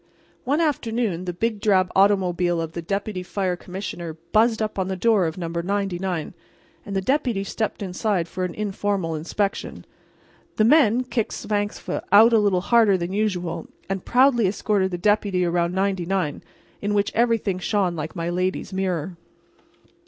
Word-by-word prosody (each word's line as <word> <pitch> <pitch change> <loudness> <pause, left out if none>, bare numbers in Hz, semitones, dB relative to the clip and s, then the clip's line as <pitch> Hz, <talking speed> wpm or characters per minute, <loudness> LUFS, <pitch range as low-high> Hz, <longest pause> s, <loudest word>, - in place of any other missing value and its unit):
One 285 +5 +1
afternoon 230 - -1
the 180 - -2
big 220 +4 -1
drab 185 -4 +3
automobile 180 -3 +3
of 165 -1 -3
the 170 - -5
Deputy 195 +2 -3
Fire 185 0 -2
Commissioner 175 -3 -6
buzzed 225 +1 +3
up 215 -1 -1
to 190 - -1
the 190 0 -3
door 200 -2 +3
of 160 - -5
No. 175 -2 -3
99 180 -1 -2 0.5
and 200 - -6
the 195 - +1
Deputy 245 -3 0
stepped 210 +1 -3
inside 185 -1 -1
for 185 +2 -4
an 180 -1 -3
informal 200 -4 -2
inspection. 185 +6 -3 0.7
The 215 - +3
men 245 -2 +5
kicked 235 -3 -2
Svangvsk 205 -1 -3
out 220 +4 +7
a 225 - +6
little 200 -3 +2
harder 220 -2 +4
than 175 +1 -4
usual 185 -5 -2 0.2
and 195 -1 -3
proudly 245 -4 +4
escorted 195 0 0
the 175 - -3
Deputy 200 -1 +1
around 170 +1 0
99, 190 -4 -1 0.4
in 205 +1 -1
which 200 0 +1
everything 225 -5 +1
shone 185 -2 0
like 155 +2 -5
my 170 -1 -3
lady's 185 +2 -2
mirror. 185 -2 -2
195 Hz, 160 wpm, -23 LUFS, 180-215 Hz, 0.7 s, out